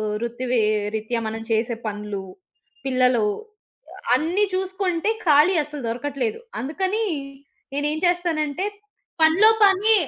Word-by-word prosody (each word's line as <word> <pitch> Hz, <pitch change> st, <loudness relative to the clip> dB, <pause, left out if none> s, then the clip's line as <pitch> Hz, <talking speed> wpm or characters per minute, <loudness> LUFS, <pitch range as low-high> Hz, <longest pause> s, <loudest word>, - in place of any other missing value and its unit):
ఆహ్, 210 Hz, -1 st, -2 dB
వృత్తి‌వి 240 Hz, +1 st, -2 dB, 0.4 s
రీత్యా 220 Hz, +2 st, -2 dB
మనం 225 Hz, +1 st, -5 dB
చేసే 225 Hz, +2 st, +1 dB
పనులు, 210 Hz, -1 st, -4 dB, 0.6 s
పిల్లలు 250 Hz, -4 st, +3 dB, 0.9 s
అన్ని 355 Hz, +7 st, +2 dB
చూసుకుంటే 375 Hz, 0 st, -1 dB, 0.2 s
ఖాళీ 305 Hz, +5 st, +5 dB
అసలు 295 Hz, -1 st, -8 dB
దొరకట్లేదు. 250 Hz, -, -3 dB, 0.2 s
అందుకని 380 Hz, -, -1 dB, 0.7 s
నేనేం 295 Hz, +2 st, 0 dB
చేస్తానంటే, 345 Hz, -2 st, 0 dB, 0.6 s
పనిలో 365 Hz, +8 st, +6 dB
పని 405 Hz, +3 st, +5 dB
290 Hz, 100 wpm, -23 LUFS, 235-365 Hz, 0.9 s, పనిలో